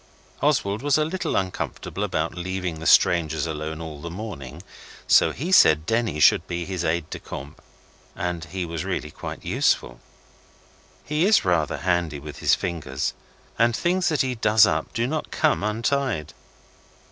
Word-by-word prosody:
Oswald 120 -8 +1
was 145 0 +2
a 155 - +2
little 175 +1 -2
uncomfortable 95 +1 -3
about 85 -5 -1
leaving 90 -2 -4
the 80 - -3
strangers 80 -3 +4
alone 80 0 -4
all 80 -3 -7
the 85 - -6
morning, 85 - -7 0.4
so - - +5
he 170 +8 -4
said 80 - +6
Denny 115 -6 0
should - - +5
be 85 -1 -3
his 90 -2 -3
aide 80 -1 0
de - - -5
camp, 70 +2 -9 0.5
and 85 -2 -3
he 90 +2 -4
was 85 -2 -4
really - - -3
quite - - -8
useful. - - 0 1.0
He 150 +2 0
is 215 - +4
rather 85 -4 +1
handy 85 -5 0
with 70 0 -9
his - - +4
fingers, 80 -6 -3 0.5
and 115 0 +3
things 180 +4 +1
that 155 -3 +1
he 130 -1 0
does 110 -2 +5
up 80 0 -1
do 115 - -1
not 155 +4 -3
come 155 -8 +1
untied. 110 - -1
90 Hz, 160 wpm, -24 LUFS, 80-120 Hz, 1.0 s, said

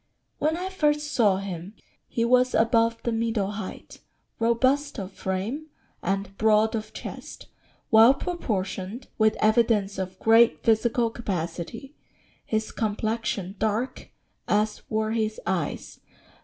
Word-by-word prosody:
] - - -49
"When 315 +2 +1
I 370 +2 -3
first 300 -4 0
saw 205 -6 +4
him, 190 0 -6 0.3
he 230 - 0
was 250 +1 +3
above 230 0 +2
the 235 - 0
middle 225 -3 0
height, 205 -2 -8 0.4
robust 260 +5 +2
of 195 -1 -5
frame, 195 +12 -3 0.3
and 195 +1 -2
broad 220 0 +4
of 215 -1 -4
chest; - - -8 0.5
well 225 +4 +8
proportioned, 220 - -4
with 220 0 +4
evidence 215 -3 +2
of 185 0 -4
great 225 +1 +4
physical 230 +1 +2
capacity; 205 - -5 0.5
his 220 0 -2
complexion 215 -3 -2
dark, 220 +4 -2 0.4
as 210 +1 +1
were 220 0 0
his 220 -1 -1
eyes. 175 -4 -3
220 Hz, 125 wpm, -26 LUFS, 200-235 Hz, 0.5 s, well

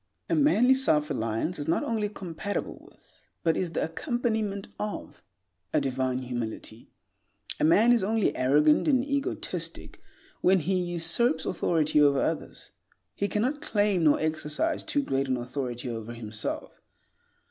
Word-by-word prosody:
A - - +4
manly 265 -4 +5
self 155 - +2
reliance 115 +9 -2
is 145 - -4
not 165 - +1
only 215 -3 -1
compatible 200 0 -5
with, - - -25 0.2
but 165 -1 +2
is 175 -3 -2
the - - 0
accompaniment 220 - -2
of, 210 0 -5 0.5
a 155 - +4
divine 130 -2 -1
humility. 120 -2 -6 0.7
A - - 0
man 210 +10 +5
is 235 - +3
only 220 +1 +1
arrogant 150 - +4
and 260 -3 +3
egotistic 280 -1 -4 0.4
when 185 0 +4
he 180 +6 -1
usurps 175 +1 +1
authority 155 -4 +2
over 140 -2 +5
others. - - -3 0.4
He 200 - -1
cannot 250 +9 -1
claim 205 - +1
nor 150 - +5
exercise 155 - -1
too 285 - -1
great 135 - -1
an 130 -1 0
authority 125 0 -4
over 115 -1 -5
himself. 110 -2 -5
165 Hz, 140 wpm, -27 LUFS, 135-215 Hz, 0.7 s, manly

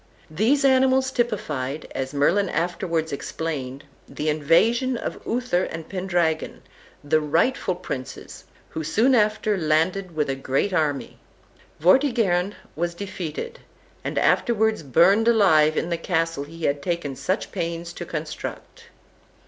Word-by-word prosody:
These 245 - +2
animals 265 0 +4
typified, 155 - -2
as 135 0 -3
Merlin 175 +8 +2
afterwards 170 -1 -1
explained, 140 -2 -4 0.3
the 155 - -2
invasion 225 - +2
of - - -5
Uther 235 -7 0
and 165 -1 -7
Pendragon, 175 -4 -1 0.4
the 155 +2 +2
rightful 175 - +1
princes, 130 -7 -7 0.2
who 160 - -5
soon 225 - +2
after 215 -2 +2
landed 165 +3 0
with 150 -1 0
a 135 - -1
great 135 +8 -1
army. 150 -5 -1 0.6
Vortigern 200 - +3 0.2
was 170 +1 -2
defeated, 200 - -6 0.4
and - - -4
afterwards 220 -3 +2
burned 175 - +4
alive 160 -9 +4
in 170 - -1
the 170 - +1
castle 165 -4 -1
he 165 +2 -11
had 140 0 0
taken 160 -4 -2
such 185 - -2
pains 170 -1 -4
to - - -6
construct. 155 -2 -6
170 Hz, 125 wpm, -24 LUFS, 155-210 Hz, 0.6 s, animals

